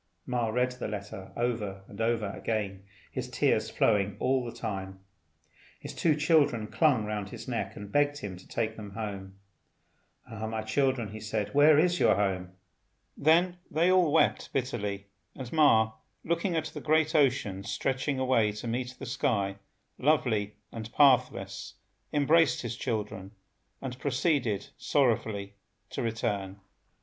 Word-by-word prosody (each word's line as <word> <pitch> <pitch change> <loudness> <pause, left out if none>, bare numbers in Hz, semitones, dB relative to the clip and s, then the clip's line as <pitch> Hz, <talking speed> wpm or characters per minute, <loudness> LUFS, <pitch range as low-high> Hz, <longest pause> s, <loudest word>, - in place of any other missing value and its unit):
Ma 125 -2 0
read 125 +3 +1
the 125 -2 -5
letter 100 -2 -7
over 105 -5 -2
and 100 +2 -8
over 115 -3 0
again, 100 -3 -3 0.3
his - - -4
tears - - +1
flowing 100 -2 +1
all 130 0 +1
the 120 - -5
time. 95 -4 -5 0.8
His - - -8
two 160 -3 +2
children 150 -7 +3
clung 130 -3 +2
round 105 -1 -3
his - - -9
neck, - - -3
and 100 0 -9
begged 145 +2 +2
him 105 -9 -6
to 90 - -15
take 110 -1 -2
them 105 -3 -9
home. 100 -3 -5 0.9
"Ah, 110 -1 -5
my 110 0 -3
children," 115 -3 0
said 110 -1 -2
he, - - -16
"where 145 +1 +6
is 175 +3 +3
your - - +5
home?" 95 -3 -1 0.6
Then 170 +4 +3
they 170 +4 +3
all 180 -5 +4
wept - - +2
bitterly, 105 -7 -2 0.3
and 130 -3 -7
Ma, 110 -9 +5 0.3
looking 170 +2 0
at 160 -1 0
the 160 - -7
great 155 +1 +2
ocean 125 - +2
stretching 135 +5 -1
away 125 -5 +2
to 105 +3 -6
meet 125 +2 -3
the 135 - -7
sky, 100 -5 0 0.4
lovely 120 -8 +1 0.2
and 115 0 -7
pathless, 130 -3 +2 0.4
embraced 150 0 +3
his 120 -1 -3
children, 105 -4 -4 0.5
and 130 -1 -5
proceeded 140 - 0
sorrowfully 110 -7 +1 0.4
to - - -3
return. 100 -4 -2
115 Hz, 145 wpm, -29 LUFS, 105-140 Hz, 0.9 s, where